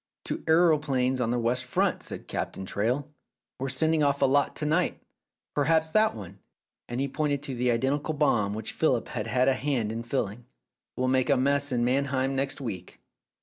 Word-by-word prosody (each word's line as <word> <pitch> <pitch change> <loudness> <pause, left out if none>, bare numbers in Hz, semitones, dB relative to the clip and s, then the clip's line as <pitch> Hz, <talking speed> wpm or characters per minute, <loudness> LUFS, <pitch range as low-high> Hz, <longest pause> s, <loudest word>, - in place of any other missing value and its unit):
"To - - -4
aeroplanes 150 -6 +3
on 115 - 0
the 120 - +1
west 120 +2 0
front," 125 - 0
said - - -6
kind - - -27
Captain 95 - -4
Traill. 120 +9 -1 0.5
"We're 135 +1 -2
sending 160 +4 +2
off 140 -1 +2
a - - +7
lot 140 +1 +2
to 150 - -2
night. 155 +4 +1 0.5
Perhaps 160 +2 +2
that 215 +3 +3
one 100 -2 -9 0.2
" - - -65
— - - -65
and 120 +1 -3
he 140 - 0
pointed 145 0 -1
to 140 - -4
the 125 0 0
identical 140 +6 0
bomb 105 -9 +2
which 110 0 -4
Philip 130 -7 +1
had 110 -2 -4
had 125 +3 +2
a 135 - +5
hand 130 -5 -1
in 115 +1 -4
filling 120 -1 -3 0.2
— - - -65
"will 130 - 0
make 130 +2 +2
a 140 - +4
mess 140 +2 +1
in 120 -1 +1
Mannheim 135 +1 0
next 135 +1 -1
week." 100 -9 -6
130 Hz, 205 wpm, -27 LUFS, 120-145 Hz, 0.5 s, a